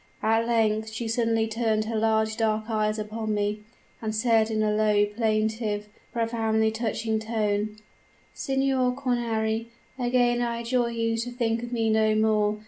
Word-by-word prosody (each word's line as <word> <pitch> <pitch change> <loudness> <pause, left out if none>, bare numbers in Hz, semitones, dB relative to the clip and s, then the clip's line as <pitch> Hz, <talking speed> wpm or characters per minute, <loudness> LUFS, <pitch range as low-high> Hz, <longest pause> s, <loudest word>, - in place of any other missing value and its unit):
At 225 +1 +2
length 220 -2 +1
she 225 +1 -4
suddenly 225 -1 +1
turned 220 -1 0
her 225 +1 -3
large 220 0 +1
dark 220 -1 0
eyes 215 0 0
upon 215 0 -3
me, 205 +1 -1 0.4
and 220 -1 -3
said 225 0 +3
in 215 -1 0
a 210 0 +1
low, 210 -1 +3
plaintive, 215 0 -1 0.2
profoundly 225 -2 +1
touching 220 0 -1
tone: 215 -1 -1 0.6
"'Signor 265 -2 +1
Cornari, 230 -4 -1 0.3
again 245 -1 +2
I 235 -1 -1
adjure 235 0 +1
you 230 -1 -1
to 230 +2 -2
think 235 -2 -1
of 240 0 -6
me 225 -2 +1
no 220 0 +3
more. 215 -1 +2
220 Hz, 150 wpm, -26 LUFS, 215-235 Hz, 0.6 s, said